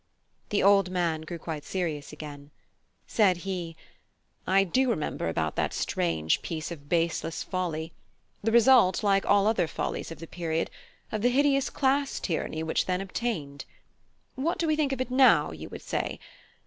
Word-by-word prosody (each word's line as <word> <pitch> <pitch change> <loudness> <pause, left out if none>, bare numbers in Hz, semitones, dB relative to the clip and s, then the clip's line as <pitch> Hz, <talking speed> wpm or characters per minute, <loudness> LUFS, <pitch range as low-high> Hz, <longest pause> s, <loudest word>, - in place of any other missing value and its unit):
The 205 - +1
old 195 -2 +5
man 170 -3 0
grew 165 +2 -6
quite 160 -2 -6
serious 165 -6 -3
again. 145 -2 -9 0.6
Said 195 -5 +3
he: 175 -4 -4 0.7
"I 195 +1 +5
do 255 +8 +1
remember 155 - -1
about 80 -1 -1
that - - 0
strange 80 -2 0
piece 160 0 -4
of 145 -4 -9
baseless 165 -1 0
folly, 170 -3 -3 0.5
the 225 - 0
result, 235 -4 +5
like 195 -1 +2
all 200 0 +4
other 215 -6 +2
follies - - -3
of 165 - -8
the 165 - -8
period, 165 -1 -2 0.4
of 215 - -2
the 245 - +4
hideous 275 +1 +2
class 275 0 +1
tyranny 160 -2 -2
which 160 - 0
then 180 -1 0
obtained. 185 -8 -4 0.7
What 285 +6 -1
do 335 - 0
we 310 -1 +2
think 300 -3 +1
of 265 -1 -2
it 255 - -3
now? 260 0 +5
you - - -8
would - - -9
say. - - -3
185 Hz, 165 wpm, -28 LUFS, 160-235 Hz, 0.7 s, old